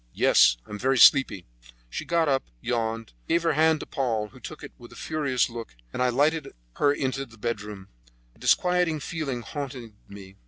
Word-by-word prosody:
"Yes; - - +5
I - - -16
am 105 - -6
very 135 +3 +1
sleepy." 110 -6 +5 0.4
She - - -6
got 170 -1 +1
up, 135 -2 +1
yawned, 115 - -3
gave 170 - +2
her 165 -2 +2
hand 160 +1 +3
to - - -6
Paul, 115 -6 -2
who 130 - -16
took 155 +4 -9
it 145 - -8
with 120 - -13
a - - -13
furious 140 -6 0
look, 115 - -8 0.2
and - - -3
I 125 - +3
lighted 145 +4 +1 0.2
her 145 - +4
into 135 -1 -2
the 115 -4 -15
bedroom. 105 -3 -5 0.5
A - - -26
disquieting 180 -3 +2
feeling 145 -6 -4
haunted 130 -6 -7
me. 100 -1 -12
130 Hz, 190 wpm, -26 LUFS, 115-150 Hz, 0.5 s, Yes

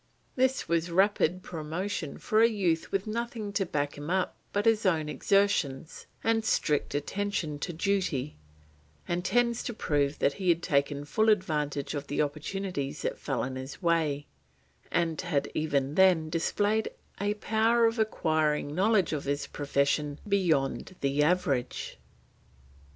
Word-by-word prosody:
This 260 0 +1
was 170 +1 +1
rapid 185 -1 +2
promotion 160 0 -4
for 215 +1 +2
a 230 - +6
youth 180 -7 0
with 195 0 0
nothing 225 -1 -4
to 195 -2 0
back 145 -2 -2
him 145 +2 -6
up 185 0 0 0.2
but 205 0 0
his 225 -1 +3
own 165 -6 +2
exertions 165 -5 0 0.2
and 225 0 +2
strict 150 -10 0
attention 160 -1 -2
to 175 - -3
duty, 170 -6 -1 0.7
and 175 +1 -1
tends 235 +4 +2
to 240 - -5
prove 145 -6 0
that 140 - +2
he 185 - +1
had 170 0 +3
taken 140 0 0
full 220 +9 +2
advantage 150 -9 0
of 145 -1 -4
the 145 - -3
opportunities 150 0 -3
that - - -2
fell 135 - -2
in 130 +1 -4
his 130 +1 -7
way, 160 -5 +1 0.6
and 165 -2 0
had 150 -6 -1
even 140 -3 0
then 175 -3 +4
displayed 205 +6 +1 0.3
a 205 +1 0
power 225 +2 +2
of 225 +1 +1
acquiring 155 -8 +1
knowledge 195 0 +2
of 145 - -3
his 140 +1 -1
profession 145 0 0
beyond 170 -6 +1
the 140 +1 +1
average. 150 -6 0
165 Hz, 145 wpm, -29 LUFS, 145-205 Hz, 0.7 s, a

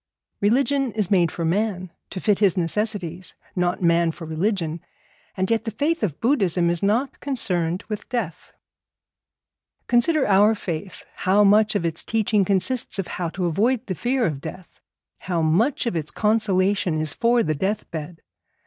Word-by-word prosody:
Religion 270 +5 +2
is 210 -3 -1
made 175 -4 +3
for 170 - -3
man, 185 0 -1 0.2
to 185 - -6
fit 205 +1 +1
his 200 -3 +3
necessities, 185 -1 -2 0.2
not 180 0 0
man 170 0 +3
for 165 - -9
religion, 165 0 -2 0.6
and 190 +3 0
yet 225 -1 +1
the 225 - -3
faith 290 +10 -1
of 180 -10 -2
Buddhism 190 - +2
is 170 - -2
not 230 +7 0
concerned 180 - -1
with 210 -2 -6
death. 230 -10 -4 1.3
Consider 265 +5 +3
our 205 +2 +5
faith, 185 -1 -6
how 195 +3 +3
much 210 +1 +4
of 175 - 0
its 165 -1 -2
teaching 215 -2 +1
consists 200 +7 0
of 195 - -2
how 175 -2 -3
to 180 +2 -3
avoid 225 +9 +1
the 190 - -3
fear 245 +6 0
of 145 -5 -2
death, 170 +3 -10 0.4
how 175 -3 -2
much 220 - +2
of 235 - -1
its 155 -2 -2
consolation 200 -5 +1
is 155 -2 0
for 235 0 +2
the 155 - 0
death 195 +8 -2
bed. 165 +1 -7
195 Hz, 165 wpm, -23 LUFS, 170-225 Hz, 1.3 s, our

